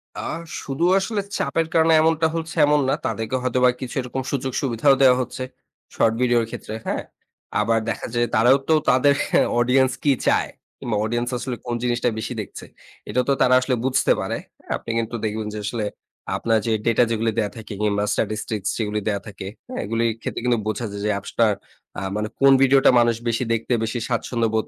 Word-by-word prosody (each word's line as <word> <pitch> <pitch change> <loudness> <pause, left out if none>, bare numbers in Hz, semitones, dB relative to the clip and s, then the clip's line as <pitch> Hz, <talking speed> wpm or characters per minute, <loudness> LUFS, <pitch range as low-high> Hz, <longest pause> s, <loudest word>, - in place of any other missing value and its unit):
আ - - -6 0.4
শুধু 135 +4 -3 0.2
আসলে 205 +1 -2 0.2
চাপের 160 +4 0
কারণে 160 0 +4
এমনটা 160 0 +3
হচ্ছে 165 0 -4
এমন 150 0 +3
না। - - +3
তাদেরকে 115 +3 -2
হয়তো 125 0 0
বা - - +7
কিছু 125 - -5
এরকম 125 +1 -4
সুযোগ 135 -1 -2
সুবিধাও 135 +1 +3
দেয়া 130 -2 +7
হচ্ছে 130 +1 -5 0.5
শর্ট 115 - +3
ভিডিওর 120 -2 +3
ক্ষেত্রে। 110 - -7
হ্যাঁ? - - -1 0.6
আবার 115 +1 +2
দেখা - - -3
যায় 120 0 +1
তারাও 120 +5 +5
তো - - +6 0.2
তাদের 130 +3 +5 0.5
অডিয়েন্স 130 +2 +3
কি 145 - +4 0.2
চায় - - +2 0.3
কিংবা 115 - -2
অডিয়েন্স 120 +2 -1
আসলে 125 +1 -4
কোন 120 -1 -2
জিনিসটা 120 0 +1
বেশি 115 +3 -4
দেখছে? 100 - -9 0.4
এটা 125 - +2
তো 140 - +4
তারা 130 - +5
আসলে 125 0 0
বুঝতে 130 0 +2
পারে, - - -2 0.3
হ্যাঁ। - - -3
আপনি - - -6
কিন্তু 115 +1 -2
দেখবেন 110 0 -3
যে, 105 - -4
আসলে 110 +1 -2 0.5
আপনার 115 -1 +1
যে, 115 - 0
ডেটা 115 +1 +4
যেগুলি 115 0 0
দেয়া 105 -3 0
থাকে 110 -1 -8
কিংবা 105 -1 +1
স্ট্যাটিস্টিকস 105 -2 -2
যেগুলি 105 -1 -1
দেয়া 100 -2 0
থাকে, 100 -2 -8 0.2
হ্যা? 255 - -8
এগুলির 115 0 0
ক্ষেত্রে - - -4
কিন্তু 120 -2 +2
বোঝা 110 +2 -2
যায় 100 0 -6
যে, - - +1
অ্যাপসটা 100 +3 0 0.5
আ - - -6
মানে 105 0 -1
কোন 135 0 +7
ভিডিওটা 135 +1 +6
মানুষ 120 -1 +3
বেশি 115 +2 0
দেখতে 115 +2 -1
বেশি 115 +2 -2
স্বাচ্ছন্দ্য 115 -1 0
বোধ 110 - 0
120 Hz, 190 wpm, -22 LUFS, 110-130 Hz, 0.6 s, বা